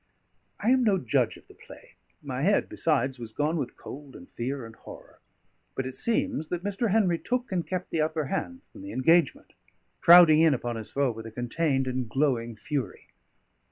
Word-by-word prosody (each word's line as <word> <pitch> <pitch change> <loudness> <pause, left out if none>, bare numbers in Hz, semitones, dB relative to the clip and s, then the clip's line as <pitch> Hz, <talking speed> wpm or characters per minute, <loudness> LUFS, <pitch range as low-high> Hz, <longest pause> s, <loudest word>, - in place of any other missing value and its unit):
I 220 +4 +2
am 260 -1 +4
no 205 -4 +3
judge 125 -10 0
of - - -20
the - - -16
play; - - -15 0.3
my 130 -2 -4
head, 200 +7 +2
besides, 135 -5 0
was 115 -2 -7
gone 150 +7 -1
with 135 -5 -4
cold 140 -1 -10
and 90 - -12
fear 130 +1 -5
and 115 0 -12
horror; - - -14 0.6
but 130 - -2
it 130 0 -6
seems 235 - 0
that 175 +1 -4
Mr. 205 +3 -1
Henry 185 -5 +2
took 250 -1 -3
and 175 -3 -2
kept 185 -1 -4
the 160 - 0
upper 155 0 -1
hand 260 - -4
from 290 - -13
the 295 - -8
engagement, 165 +3 +2 0.5
crowding 170 -3 +8
in 160 -4 +5
upon 120 -1 -4
his 110 -2 -7
foe 140 -2 0
with 115 0 -8
a - - -9
contained 135 +4 -1
and 130 -2 -3
glowing 120 -3 0
fury. 125 -3 -5
150 Hz, 190 wpm, -27 LUFS, 125-180 Hz, 0.6 s, crowding